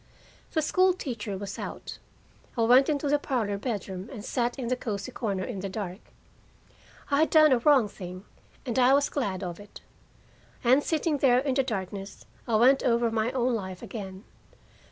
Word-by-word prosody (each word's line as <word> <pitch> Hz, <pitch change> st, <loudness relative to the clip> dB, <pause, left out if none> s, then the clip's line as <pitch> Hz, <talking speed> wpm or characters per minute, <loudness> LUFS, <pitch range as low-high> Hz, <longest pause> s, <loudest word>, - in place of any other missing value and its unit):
The 315 Hz, -, +1 dB
school 370 Hz, +4 st, +3 dB
teacher 230 Hz, -, -5 dB
was 200 Hz, 0 st, -6 dB
out. -, -, -7 dB, 0.6 s
I 230 Hz, -, +2 dB
went 250 Hz, +5 st, +6 dB
into 290 Hz, -1 st, 0 dB
the 290 Hz, +1 st, +2 dB
parlor 220 Hz, -8 st, -1 dB
bedroom 200 Hz, -3 st, -4 dB
and 220 Hz, -6 st, -8 dB
sat 240 Hz, +1 st, -1 dB
in 255 Hz, -3 st, -4 dB
the 255 Hz, -, +2 dB
cozy 225 Hz, 0 st, -4 dB
corner 200 Hz, -7 st, -2 dB
in 205 Hz, -1 st, -5 dB
the 195 Hz, +1 st, -4 dB
dark. 190 Hz, -1 st, -5 dB, 1.1 s
I 280 Hz, -, +3 dB
had 315 Hz, -, +3 dB
done 310 Hz, -2 st, +6 dB
a 255 Hz, -, +4 dB
wrong 265 Hz, -3 st, +4 dB
thing, 185 Hz, -1 st, -9 dB, 0.4 s
and 245 Hz, -1 st, -1 dB
I 255 Hz, +2 st, +6 dB
was 285 Hz, 0 st, +2 dB
glad 200 Hz, -9 st, -2 dB
of 175 Hz, -2 st, -5 dB
it. 205 Hz, 0 st, -13 dB, 0.8 s
And 260 Hz, +4 st, +4 dB
sitting 315 Hz, -2 st, 0 dB
there 250 Hz, -3 st, +5 dB
in 270 Hz, +1 st, +1 dB
the 270 Hz, -, +3 dB
darkness, 195 Hz, -5 st, -5 dB, 0.2 s
I 230 Hz, -, +1 dB
went 255 Hz, +5 st, +5 dB
over 235 Hz, -1 st, +2 dB
my 225 Hz, +1 st, 0 dB
own 255 Hz, -1 st, +1 dB
life 190 Hz, -5 st, -5 dB
again. 190 Hz, -3 st, -7 dB
235 Hz, 180 wpm, -27 LUFS, 200-270 Hz, 1.1 s, went